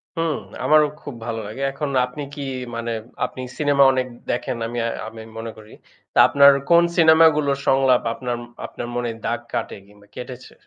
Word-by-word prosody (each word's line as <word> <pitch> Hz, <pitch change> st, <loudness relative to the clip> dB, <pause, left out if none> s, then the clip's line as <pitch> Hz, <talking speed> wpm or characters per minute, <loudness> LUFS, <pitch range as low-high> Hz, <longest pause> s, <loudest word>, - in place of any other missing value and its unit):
হুম 165 Hz, -2 st, 0 dB, 0.3 s
আমারও 150 Hz, 0 st, +5 dB
খুব 145 Hz, -, -8 dB
ভালো 115 Hz, -1 st, -3 dB
লাগে। 110 Hz, +6 st, -7 dB
এখন 145 Hz, +1 st, -4 dB, 0.2 s
আপনি 125 Hz, +4 st, -8 dB
কি 145 Hz, -, -6 dB, 0.3 s
মানে, 115 Hz, 0 st, -3 dB, 0.3 s
আপনি 130 Hz, -, -7 dB, 0.2 s
সিনেমা 145 Hz, -2 st, +3 dB
অনেক 130 Hz, -1 st, -1 dB, 0.2 s
দেখেন 120 Hz, 0 st, -2 dB
আমি 120 Hz, -, -6 dB, 0.3 s
আমি 110 Hz, 0 st, -9 dB, 0.2 s
মনে 115 Hz, 0 st, -5 dB
করি। 110 Hz, 0 st, -14 dB, 0.4 s
তা -, -, +2 dB
আপনার 140 Hz, 0 st, +7 dB, 0.2 s
কোন 170 Hz, 0 st, +6 dB
সিনেমাগুলোর 160 Hz, -3 st, +5 dB
সংলাপ 135 Hz, -2 st, +4 dB
আপনার 125 Hz, 0 st, -4 dB, 0.3 s
আপনার 120 Hz, -, -7 dB
মনে 120 Hz, -1 st, -1 dB, 0.2 s
দাগ -, -, -1 dB
কাটে, -, -, -3 dB
কিংবা 105 Hz, 0 st, -20 dB
কেটেছে? 125 Hz, 0 st, -9 dB
130 Hz, 165 wpm, -22 LUFS, 120-150 Hz, 0.4 s, আপনার